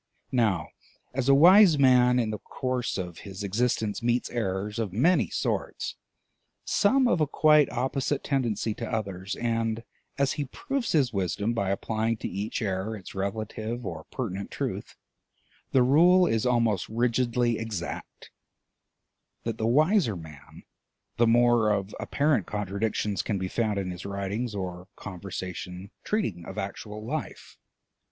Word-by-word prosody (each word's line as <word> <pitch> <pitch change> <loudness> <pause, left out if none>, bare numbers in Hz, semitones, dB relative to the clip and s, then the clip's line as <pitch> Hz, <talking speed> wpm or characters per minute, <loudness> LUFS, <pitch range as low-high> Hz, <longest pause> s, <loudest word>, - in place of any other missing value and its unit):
Now 110 -10 +1 0.4
as 135 0 0
a 140 - +7
wise 180 +2 +8
man 125 -2 +5
in 115 -3 +1
the 105 - -4
course 130 -1 -3
of 90 -3 -5
his 100 0 -8
existence 110 +1 0
meets 120 +1 0
errors 105 -1 -2
of 110 -5 -2
many 160 - +3
sorts, - - -2 0.7
some 260 +5 +3
of 175 -9 +2
a 155 - +3
quite 150 0 +5
opposite 130 +3 -1
tendency 115 -6 0
to 115 +1 -6
others, 100 -3 -3
and 115 -1 -1 0.3
as 140 -1 +2
he 145 -2 -2
proves 265 - -3
his 135 -7 +2
wisdom 100 +3 -1
by 100 -5 -1
applying 110 +3 -1
to - - -4
each 100 +5 -3
error 100 +2 -2
its 95 - -11
relative 110 +4 -4
or - - -6
pertinent 100 -6 -4
truth, - - -4 0.8
the 130 - +5
rule 175 +8 +6
is 115 -6 +1
almost 115 -6 +1
rigidly 120 0 +1
exact: 105 -6 -6 1.1
that 115 -1 -3
the 110 - +1
wiser 155 - +3
the 85 - -8
man 75 -3 -13 0.5
the 120 - +4
more 120 -1 +4
of 100 0 -1
apparent 140 - +1
contradictions 105 0 -1
can 105 - -2
be 95 0 -2
found 110 0 -1
in 95 -2 -2
his 90 +1 -7
writings 100 +4 -3
or 90 -2 -5
conversation 95 0 -7
treating 110 - -1
of 95 - -9
actual 105 +2 -5
life. - - -6
110 Hz, 145 wpm, -27 LUFS, 100-125 Hz, 1.1 s, wise